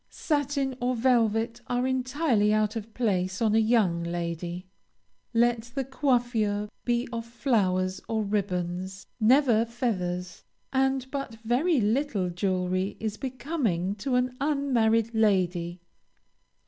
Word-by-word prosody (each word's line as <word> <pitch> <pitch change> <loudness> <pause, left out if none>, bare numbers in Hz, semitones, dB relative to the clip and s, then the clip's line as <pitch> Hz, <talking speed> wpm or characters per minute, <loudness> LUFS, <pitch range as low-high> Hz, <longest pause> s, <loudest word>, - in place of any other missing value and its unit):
Satin 285 -3 -1
or 250 +1 +1
velvet 230 -1 +2
are 245 0 0
entirely 255 -4 +1
out 215 0 +1
of 225 0 -5
place 185 -5 0
on 220 -2 +2
a 220 - +5
young 215 -7 +2
lady. 170 +1 -4 0.7
Let 235 0 +3
the 270 - 0
coiffure 240 -6 0 0.2
be 240 0 +1
of 230 0 -3
flowers 195 -6 0
or 220 -1 0
ribbons, 190 -2 -2
never 240 0 +4
feathers, 185 -7 -3 0.3
and 265 -1 +1
but 275 -5 -4
very 275 +7 +2
little 215 -4 0
jewelry 185 +1 -1
is 215 -1 -3
becoming 245 - -2
to 250 +5 -1
an 250 0 +1
unmarried 235 -6 +2
lady. 180 -5 +1
225 Hz, 120 wpm, -27 LUFS, 190-250 Hz, 0.7 s, a